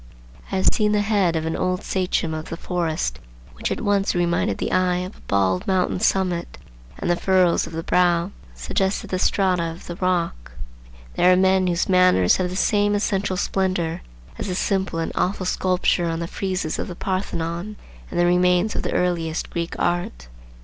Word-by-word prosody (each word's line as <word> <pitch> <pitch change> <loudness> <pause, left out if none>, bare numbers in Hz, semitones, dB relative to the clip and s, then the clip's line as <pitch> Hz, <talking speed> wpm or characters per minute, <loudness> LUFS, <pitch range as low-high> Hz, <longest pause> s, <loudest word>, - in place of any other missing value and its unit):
I - - -1
have 190 - +4
seen 210 -1 +2
the 210 - +3
head 200 -5 +1
of 160 0 -1
an 160 - -2
old 185 0 -1
sachem 180 -3 -1
of 155 0 -5
the 165 - -5
forest 165 - -2 0.3
which - - -3
at - - -2
once 200 -2 +1
reminded 175 0 +1
the - - -3
eye 185 -1 +2
of 180 +3 -5
a - - -20
bald 95 -2 +1
mountain 185 -1 +1
summit, 180 -3 0 0.4
and - - -4
the 175 - +3
furrows 185 -1 +2
of - - -10
the 165 0 -4
brow 175 +1 +2 0.2
suggested 190 - -2
the 185 - 0
strata 185 -2 +2
of 165 0 -5
the 175 - -6
rock. 175 - -1 0.6
There 180 - +5
are - - +6
men 190 0 +3
whose 175 -1 0
manners 180 - +4
have 185 -1 -1
the 180 - -5
same 205 +1 +2
essential 195 -2 0
splendor 185 -4 -1 0.4
as - - -3
the 180 - -2
simple 190 -2 -1
and 165 - -2
awful 185 0 -1
sculpture 180 -1 +1
on 165 - -2
the 170 - -3
friezes 185 -2 -3
of - - -3
the 180 - -7
Parthenon 185 +1 -3 0.3
and 175 - -3
the 175 - +4
remains 180 +3 +3
of - - -1
the - - -3
earliest 170 -3 -1
Greek 170 -1 -3
art. 175 - -2
180 Hz, 190 wpm, -22 LUFS, 170-190 Hz, 0.6 s, are